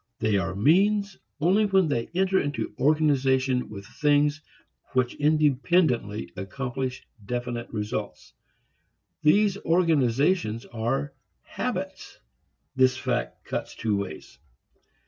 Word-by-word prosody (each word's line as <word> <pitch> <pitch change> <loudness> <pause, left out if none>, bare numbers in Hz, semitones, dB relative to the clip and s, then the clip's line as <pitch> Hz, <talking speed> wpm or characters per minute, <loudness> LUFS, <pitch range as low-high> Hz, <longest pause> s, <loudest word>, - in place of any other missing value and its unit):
They 110 -2 +1
are 95 -1 -2
means 200 - +3 0.2
only 190 +7 +3
when 190 -3 +3
they 120 -6 -1
enter 190 +1 +2
into 145 0 -3
organization 135 -4 +2
with 100 -1 -9
things 145 +4 +1 0.5
which 130 -1 +1
independently 145 - +1
accomplish 125 +6 -4 0.2
definite 120 +2 -4
results. 105 0 -5 0.9
These 195 +5 +4
organizations 150 - +1
are 135 +5 -2 0.3
habits. - - -5 0.6
This 130 -1 +3
fact 65 - -3
cuts - - -4
two 110 -2 -1
ways. 100 0 -6
135 Hz, 100 wpm, -26 LUFS, 115-160 Hz, 0.9 s, These